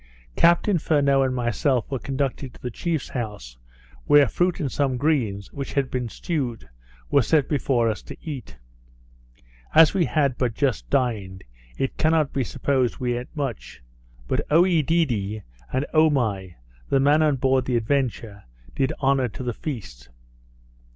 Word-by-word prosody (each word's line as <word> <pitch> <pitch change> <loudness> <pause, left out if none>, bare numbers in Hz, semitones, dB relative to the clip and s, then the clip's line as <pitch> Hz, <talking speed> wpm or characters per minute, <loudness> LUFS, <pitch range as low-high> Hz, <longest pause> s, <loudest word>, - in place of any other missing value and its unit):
Captain 170 +2 +4
Furneaux 140 -3 +2
and 130 -1 0
myself 125 +2 0
were 135 - -1
conducted 135 0 -3
to - - -15
the 125 - -3
chief's 160 +4 -3
house, 105 - -6 0.5
where 145 -2 +6
fruit 175 - 0
and 140 -6 -2
some 135 -3 0
greens, 120 -9 -1
which 140 -1 -5
had 135 -2 0
been 125 -2 -2
stewed, 125 - -4 0.4
were 140 - +5
set 145 +3 +2
before 130 -5 +1
us 110 -2 -2
to - - -10
eat. 135 - -7 1.2
As 160 -1 +7
we 185 -4 +2
had 140 -5 0
but 120 -4 0
just 130 -4 -1
dined, 110 -8 -1 0.3
it 135 - -2
cannot 155 -2 +2
be 135 - 0
supposed 130 +1 0
we 125 -1 -1
eat 125 - -8
much; 135 - -5 0.4
but - - 0
Oedidee, 155 - +2 0.3
and 130 +2 0
Omai, 120 - +2 0.3
the 135 - +3
man 145 +3 +4
on 150 -2 +3
board 130 0 +1
the 125 -2 +1
Adventure, 115 -4 -2 0.3
did 130 - 0
honour 135 -1 +3
to 125 +4 -8
the 120 -1 -2
feast. 90 - -7
130 Hz, 150 wpm, -24 LUFS, 120-145 Hz, 1.2 s, As